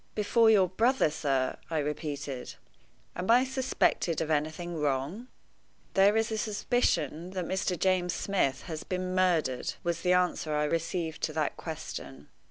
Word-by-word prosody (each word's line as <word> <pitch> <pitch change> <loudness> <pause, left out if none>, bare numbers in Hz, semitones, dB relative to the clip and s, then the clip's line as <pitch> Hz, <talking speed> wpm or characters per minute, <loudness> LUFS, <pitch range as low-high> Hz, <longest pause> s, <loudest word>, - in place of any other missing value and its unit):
"Before 220 +2 +4
your 200 -4 +5
brother, 225 - +2
sir!" 135 -4 0
I 165 - -1
repeated. 145 -3 -4 0.6
"Am 180 +3 -4
I 245 +2 +6
suspected 260 - 0
of 160 -1 -2
anything 155 +3 -1
wrong?" 150 - -1 0.7
"There 200 +3 +5
is 225 0 +1
a 220 - -1
suspicion 210 -6 0
that 185 -2 -2
Mr. 185 0 -1
James 180 0 +1
Smith 140 -9 0
has 160 -2 -6
been 185 0 -3
murdered," 170 -9 +1
was 170 -1 -1
the 180 0 +3
answer 175 -3 +1
I 150 - +1
received 165 +1 -2
to 155 - -1
that 155 -2 -1
question. 75 - -7
175 Hz, 150 wpm, -29 LUFS, 150-195 Hz, 0.7 s, I